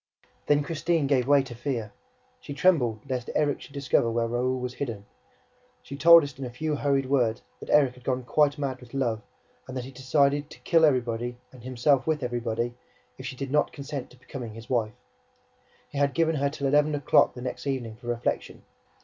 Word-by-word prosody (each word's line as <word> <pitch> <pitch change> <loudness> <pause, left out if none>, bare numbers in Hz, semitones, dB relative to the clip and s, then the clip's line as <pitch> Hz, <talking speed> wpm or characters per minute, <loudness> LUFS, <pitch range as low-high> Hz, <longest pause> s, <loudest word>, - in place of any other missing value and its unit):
Then 145 0 +3
Christine 165 0 0
gave 135 -3 +2
way 140 -1 +5
to 130 -2 -9
fear. 120 -3 -3 0.5
She 145 - -8
trembled 125 -11 +2
lest 125 -2 -3
Erik 145 -2 +1
should 140 - -13
discover 130 -4 +2
where 115 0 0
Raoul 125 +2 0
was 125 0 -4
hidden; 115 -7 -5 0.8
she 140 - -8
told 170 +2 +8
us 140 -2 -7
in - - -4
a - - -5
few 150 +5 -2
hurried 140 -1 +1
words 125 -4 +1 0.2
that - - -10
Erik 140 -4 +4
had 125 0 -17
gone 130 0 -1
quite 145 +3 +2
mad 135 -3 -3
with 125 +1 -12
love 120 -5 0 0.5
and 130 0 -6
that 125 - -3
he 130 - -9
had - - -23
decided 140 +2 +2
TO - - -12
KILL 165 -2 +4
EVERYBODY 120 -3 0
AND 130 - -14
HIMSELF 130 +2 +1
WITH 155 -3 0
EVERYBODY 120 -1 -2 0.5
if 130 - -6
she 130 - -6
did 135 +1 -5
not 150 +1 +2
consent 140 -2 -6
to 125 - -18
become 130 +1 -9
his 115 0 -8
wife. 110 -4 0 0.9
He 140 - -4
had 140 -1 +1
given 165 -1 +2
her 140 0 +1
till 140 -1 -5
eleven 150 +2 +3
o'clock 140 -2 +3
the 125 - -8
next 125 +2 -5
evening 120 -5 -3
for 120 0 -13
reflection. 120 0 -2
130 Hz, 205 wpm, -27 LUFS, 120-145 Hz, 0.9 s, told